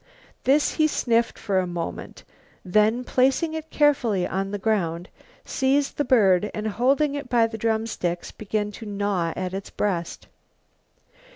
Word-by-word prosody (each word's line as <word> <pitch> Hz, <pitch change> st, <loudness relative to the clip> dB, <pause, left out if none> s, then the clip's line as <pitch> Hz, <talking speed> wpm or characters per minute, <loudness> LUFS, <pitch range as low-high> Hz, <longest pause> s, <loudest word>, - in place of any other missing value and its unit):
This 285 Hz, +3 st, +3 dB
he 310 Hz, -, +3 dB
sniffed 235 Hz, -5 st, +1 dB
for 195 Hz, -3 st, 0 dB
a 185 Hz, -, -1 dB
moment, 175 Hz, -1 st, -6 dB, 0.4 s
then, 215 Hz, +6 st, +2 dB
placing 270 Hz, +6 st, +1 dB
it 320 Hz, 0 st, -6 dB
carefully 240 Hz, -11 st, +2 dB
on 195 Hz, +1 st, -2 dB
the 205 Hz, -, -3 dB
ground, 185 Hz, -5 st, -1 dB, 0.4 s
seized 275 Hz, +2 st, 0 dB
the 290 Hz, -, +2 dB
bird 210 Hz, -7 st, +3 dB
and 215 Hz, +1 st, -3 dB
holding 275 Hz, +7 st, +2 dB
it 285 Hz, -3 st, -5 dB
by 235 Hz, -2 st, +4 dB
the 225 Hz, 0 st, -5 dB
drumsticks 220 Hz, -6 st, -2 dB
began 210 Hz, 0 st, -3 dB
to 220 Hz, +1 st, -9 dB
gnaw 200 Hz, -4 st, -1 dB
at 185 Hz, 0 st, -4 dB
its 195 Hz, +1 st, -5 dB
breast. 175 Hz, -5 st, -3 dB
215 Hz, 150 wpm, -24 LUFS, 190-260 Hz, 0.4 s, by